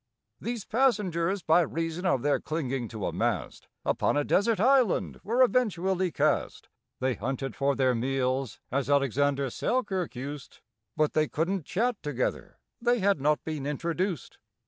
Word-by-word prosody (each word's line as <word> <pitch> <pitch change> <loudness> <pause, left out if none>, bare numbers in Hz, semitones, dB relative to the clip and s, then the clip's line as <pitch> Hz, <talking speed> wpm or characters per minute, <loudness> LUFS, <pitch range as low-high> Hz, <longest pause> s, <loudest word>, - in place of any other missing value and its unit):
These 235 -3 -4
passengers, 200 -7 +1
by 160 +3 +5
reason 165 +3 -2
of 135 -8 +1
their 145 0 +2
clinging 135 -6 -3
to 110 -3 -5
a - - -2
mast, - - -2 0.2
Upon - - +1
a 145 - +2
desert 205 +7 +2
island 255 -2 +3
were 240 +5 +3
eventually 190 -7 +1
cast. - - 0 0.3
They 130 0 +1
hunted 130 +3 -4
for 140 0 +1
their 130 -1 +3
meals, 130 0 -1
as 135 +1 -1
ALEXANDER 140 0 +2
SELKIRK 190 - -1
used, 140 +2 -7 0.4
But 155 -1 +2
they 155 0 +2
couldn't 170 +2 -1
chat 235 +3 0
together—they 150 - -2
had 195 - +2
not 150 +2 +2
been 150 -3 -4
introduced. 170 - -2
155 Hz, 145 wpm, -28 LUFS, 135-195 Hz, 0.4 s, by